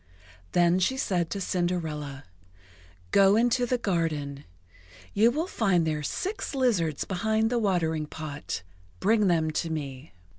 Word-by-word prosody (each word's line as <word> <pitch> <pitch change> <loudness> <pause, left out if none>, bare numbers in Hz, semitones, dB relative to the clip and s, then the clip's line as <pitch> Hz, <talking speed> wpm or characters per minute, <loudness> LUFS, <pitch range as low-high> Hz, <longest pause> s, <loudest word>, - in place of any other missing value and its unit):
Then 175 +1 +4
she 260 +8 +1
said 175 -9 0
to 200 - -3
Cinderella: 160 -7 -2 0.9
"Go 195 +1 +6
into 245 +2 +2
the 250 - +1
garden. 155 - -2 0.7
You 220 +3 +5
will 305 +7 -1
find 195 - +1
there 155 -1 -1
six 385 - -3
lizards 190 - +1
behind 220 +4 0
the 240 - +2
watering 165 -7 0
pot. 150 - -6 0.4
Bring 215 0 +3
them 160 -3 +2
to 165 +2 -2
me." 140 -2 -5
175 Hz, 135 wpm, -27 LUFS, 155-220 Hz, 0.9 s, Go